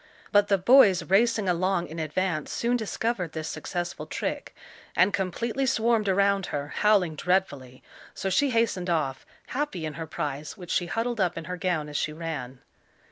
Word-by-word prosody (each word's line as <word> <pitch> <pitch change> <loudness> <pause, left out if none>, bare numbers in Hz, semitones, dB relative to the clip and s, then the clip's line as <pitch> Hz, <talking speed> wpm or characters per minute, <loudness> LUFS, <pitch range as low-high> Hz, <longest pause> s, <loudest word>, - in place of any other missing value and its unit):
But 205 -1 +5
the 200 - +3
boys 195 -2 +6
racing 215 +1 +2
along 180 0 +1
in 165 +1 -7
advance 160 0 -2
soon 240 +1 0
discovered 220 -5 -2
this 155 -1 -4
successful 175 +3 -4
trick, - - -4 0.4
and 185 +3 +4
completely 230 +8 -1
swarmed 225 -3 +2
around 195 0 +2
her, 145 0 -4
howling 200 -5 +2
dreadfully, 145 -7 -1 0.3
so - - -3
she 275 +9 +2
hastened 225 -7 0
off, 145 -6 -1 0.2
happy 260 - -2
in 155 - -4
her 160 +2 -6
prize, 145 +4 -4
which 180 -3 -8
she 175 - +1
huddled 230 +3 -1
up 175 -2 0
in 165 - -4
her 180 +3 -5
gown 175 -4 -1
as 145 -1 -4
she 155 - -1
ran. 145 -6 -6
185 Hz, 170 wpm, -27 LUFS, 160-210 Hz, 0.4 s, boys